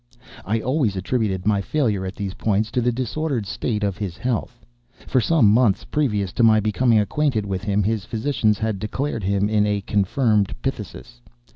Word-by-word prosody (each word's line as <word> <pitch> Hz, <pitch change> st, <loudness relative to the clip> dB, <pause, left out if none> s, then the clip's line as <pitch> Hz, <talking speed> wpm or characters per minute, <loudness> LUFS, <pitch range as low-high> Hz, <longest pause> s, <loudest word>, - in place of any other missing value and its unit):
I 110 Hz, +2 st, 0 dB
always 130 Hz, -6 st, 0 dB
attributed 95 Hz, -1 st, -1 dB
my 105 Hz, -2 st, +2 dB
failure 105 Hz, -7 st, -1 dB
at 95 Hz, -, -6 dB
these 100 Hz, -2 st, -4 dB
points 110 Hz, +1 st, 0 dB
to 125 Hz, -, 0 dB
the 120 Hz, +1 st, +2 dB
disordered 130 Hz, 0 st, -2 dB
state 105 Hz, +2 st, -3 dB
of 100 Hz, -2 st, -1 dB
his 95 Hz, -5 st, -4 dB
health. 120 Hz, +3 st, -3 dB, 0.4 s
For 130 Hz, -, +2 dB
some 145 Hz, -1 st, +3 dB
months 110 Hz, -3 st, +3 dB
previous 105 Hz, -11 st, -1 dB
to 120 Hz, -, +1 dB
my 110 Hz, -1 st, +6 dB
becoming 110 Hz, +3 st, +2 dB
acquainted 110 Hz, +1 st, 0 dB
with 95 Hz, -1 st, -3 dB
him, 100 Hz, 0 st, +1 dB
his 110 Hz, 0 st, -1 dB
physicians 110 Hz, -2 st, 0 dB
had 110 Hz, -2 st, -2 dB
declared 115 Hz, +2 st, -3 dB
him 100 Hz, +1 st, +1 dB
in 105 Hz, -1 st, +2 dB
a 105 Hz, -1 st, 0 dB
confirmed 105 Hz, +1 st, +1 dB
phthisis. 120 Hz, -1 st, -6 dB
110 Hz, 175 wpm, -22 LUFS, 100-125 Hz, 0.4 s, my